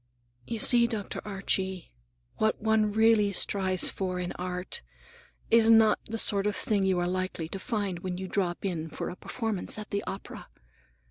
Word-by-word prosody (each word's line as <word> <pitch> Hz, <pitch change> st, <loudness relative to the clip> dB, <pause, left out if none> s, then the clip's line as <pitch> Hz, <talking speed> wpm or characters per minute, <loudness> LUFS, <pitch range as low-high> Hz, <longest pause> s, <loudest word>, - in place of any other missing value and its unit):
"You 230 Hz, -, -3 dB
see, 235 Hz, +2 st, +5 dB
Dr. 220 Hz, -4 st, -5 dB
Archie, 190 Hz, -, -2 dB, 0.4 s
what 215 Hz, 0 st, +1 dB
one 220 Hz, -1 st, +2 dB
really 220 Hz, -1 st, +4 dB
strives 190 Hz, -1 st, +2 dB
for 185 Hz, -2 st, -2 dB
in 180 Hz, -1 st, -3 dB
art 180 Hz, -, -3 dB, 0.7 s
is 230 Hz, -1 st, +6 dB
not 225 Hz, -1 st, +6 dB
the 225 Hz, -, -4 dB
sort 200 Hz, -2 st, +3 dB
of 210 Hz, -, -1 dB
thing 200 Hz, -3 st, 0 dB
you 190 Hz, -1 st, +2 dB
are 175 Hz, 0 st, 0 dB
likely 185 Hz, -2 st, -3 dB
to 195 Hz, -, -5 dB
find 200 Hz, -4 st, -3 dB
when 180 Hz, 0 st, -4 dB
you 190 Hz, 0 st, -5 dB
drop 180 Hz, -1 st, -2 dB
in 165 Hz, -4 st, -3 dB
for -, -, -5 dB
a -, -, -8 dB
performance 220 Hz, -1 st, -3 dB
at 210 Hz, -1 st, -8 dB
the 200 Hz, -, -1 dB
opera. 195 Hz, -, -7 dB
200 Hz, 175 wpm, -28 LUFS, 185-220 Hz, 0.7 s, is